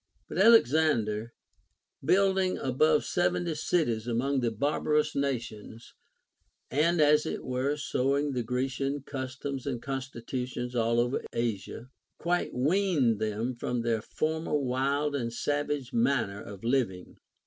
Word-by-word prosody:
But 170 - -4
Alexander, 145 - +4 0.7
building 190 +3 +3
above 150 +4 +2
seventy 175 -1 0
cities 135 -8 0
among 130 +4 0
the 120 -2 +1
barbarous 150 +6 0
nations, 120 -5 -4 0.8
and 160 +6 +2
as 150 0 +4
it - - -4
were 130 +3 -1
sowing 140 0 0
the 125 -2 -1
Grecian 135 +4 -2
customs 135 0 -5
and 125 -4 -2
constitutions 125 -1 -4
all 115 0 +2
over 120 +2 0
Asia, 115 +2 -3 0.3
quite 175 +1 0
Aveaned 145 - +2
them 110 +4 -1
from 120 0 -2
their 115 -2 0
former 160 +4 -1
wild 140 +2 0
and 120 -4 -2
savage 145 0 -2
manner 115 -4 +1
of 100 0 -10
living. 115 -7 -1
130 Hz, 120 wpm, -29 LUFS, 120-150 Hz, 0.8 s, Alexander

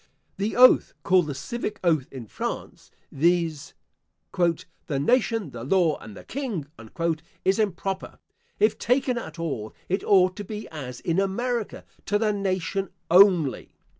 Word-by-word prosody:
The 205 +3 -2
oath, 255 +1 +6
called 180 -1 +3
the 145 - -4
civic 215 - -4
oath, 155 -7 +2
in 130 -4 -8
France, - - -6 0.2
viz., 165 -1 0 0.6
"the 165 -4 -1
nation, 225 - +1
the 115 -2 -7
law, 165 +1 +2
and 105 -2 -11
the - - -11
king," 235 - -4 0.8
is 190 +3 +3
improper. 195 -2 -2 0.4
If 215 0 +3
taken 250 0 +1
at 165 -7 -9
all, 135 -10 -4
it 190 +3 0
ought 185 -2 +4
to 205 - -4
be 210 +2 -7
as 130 -6 -7
in 170 +1 0
America, 230 +4 -2 0.2
to 205 - +2
the 210 -1 +1
nation 195 0 -2 0.2
only. 180 -6 +4
185 Hz, 140 wpm, -25 LUFS, 155-210 Hz, 0.8 s, oath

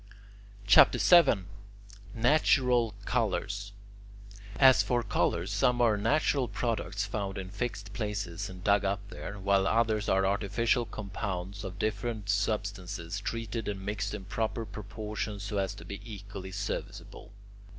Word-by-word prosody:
CHAPTER 100 - +7
VII 155 - +5 0.7
NATURAL 125 -3 +3
COLOURS 100 -3 -1 0.9
As 130 -2 +7
for 120 -1 0
colours, 85 -2 0
some 120 +5 +2
are 115 -3 +4
natural 130 +4 +1
products 105 -2 -2
found 100 -2 -4
in 95 -1 -6
fixed 105 -1 -4
places, 105 -7 -3
and 90 -1 -10
dug 100 0 +3
up 100 0 0
there, 105 -2 -7
while 100 0 +2
others 110 -1 +1
are 95 0 +3
artificial 110 +4 +1
compounds 100 -1 -5
of 95 -2 -6
different 110 0 -2
substances 100 -3 -2
treated 115 +1 -4
and 95 -2 -4
mixed 105 0 -2
in 100 -2 -8
proper 110 +2 -2
proportions 105 0 -5
so 100 0 -2
as 95 -1 -2
to 85 - -11
be 100 +2 -7
equally 100 -3 -8
serviceable. 100 +1 -6
105 Hz, 130 wpm, -30 LUFS, 100-115 Hz, 0.9 s, CHAPTER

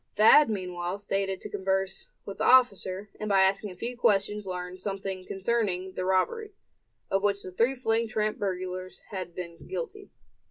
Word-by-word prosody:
Thad 225 +6 +7
meanwhile 180 -2 -3
stated 195 -1 -1
to - - -6
converse 190 -1 -1 0.2
with 200 - -7
the - - 0
officer, 205 -6 +4
and 215 - -3
by 195 -1 +5
asking 195 +2 +1
a 180 - -9
few 235 +7 -4
questions 210 -3 +1
learned 180 0 -5
something 195 -1 -4
concerning 190 -3 -1
the 185 - -3
robbery, 410 - +1 0.6
of 195 - +2
which 200 0 +1
the 185 - -7
three 230 +8 +2
fleeing 230 -2 +1
tramp 215 -1 -1
burglars 185 -2 -3
had 185 -4 -5
been 170 -2 -6
guilty. 420 -1 -5
195 Hz, 165 wpm, -28 LUFS, 185-215 Hz, 0.6 s, Thad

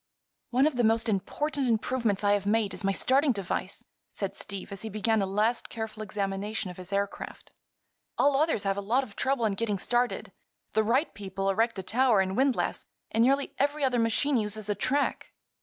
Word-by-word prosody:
"One 255 +3 +3
of 305 -5 +1
the 245 - +2
most 225 +1 +3
important 270 - -1
improvements 225 -2 0
I 205 - +4
have 200 -1 0
made 210 -1 +2
is - - -6
my 195 - +2
starting 270 +7 +3
device," 195 -4 -4 0.3
said - - -4
Steve, 200 -2 -5
as 195 -1 -5
he 220 - -4
began 215 +1 +1
a 195 - 0
last 215 +5 0
careful 220 -1 -5
examination 200 -1 -3
of 180 - -13
his 185 +1 -7
aircraft. 200 0 -3 0.7
"All 285 -1 +4
others 295 -7 +2
have 195 0 0
a - - -1
lot 235 +7 +1
of 215 -6 -11
trouble 265 -3 +1
in 210 - +1
getting 210 0 -1
started. 240 +5 0 0.4
The 220 - +3
Wright 255 +8 +1
people 195 -1 -2
erect 225 +2 +1
a 190 - -4
tower 240 +1 +3
and 190 0 0
windlass, 265 +1 +1 0.3
and 225 +1 +3
nearly 275 +3 +2
every 290 +1 +1
other 255 -3 +2
machine 240 +5 +2
uses 215 -1 -2
a - - +3
track." 265 +8 -1
220 Hz, 195 wpm, -28 LUFS, 200-255 Hz, 0.7 s, I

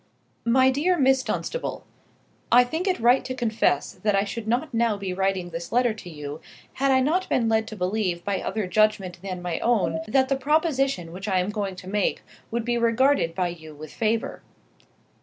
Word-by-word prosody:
MY 260 +2 +5
DEAR 340 +7 +1
MISS 265 -2 +4
DUNSTABLE, 260 - -4 0.7
I 245 +1 +8
think 320 +10 -3
it 370 - +1
right 245 +3 +4
to 255 - -5
confess 220 - +1
that 210 -2 0
I 195 - +3
should 215 +2 -6
not 250 +7 0
be 230 - -3
now 230 -3 +2 0.2
writing 190 -2 -1
this 170 +1 -6
letter 245 -1 +2
to 215 -5 -10
you, 150 -1 -7 0.3
had 275 +1 0
I 260 -1 +4
not 330 +8 0
been 235 -3 +2
led 220 0 +1
to 215 - -7
believe 185 -2 -1
by 200 -1 -1
other 215 -2 -2
judgment 195 -2 +1
than 185 -2 -6
my 175 -2 -2
own 230 -2 +1
that 260 +4 +3
the 275 - +1
proposition 275 - +1
which 190 +4 -7
I 190 -2 +1
am 185 +3 0
going 200 -3 -3
to 185 0 -11
make 205 0 0 0.3
would 235 0 -2
be 240 0 0
regarded 235 -6 +2
by 180 -2 0
you 160 -3 -10
with 155 0 -10
favour. 225 0 -1
220 Hz, 195 wpm, -25 LUFS, 185-260 Hz, 0.7 s, I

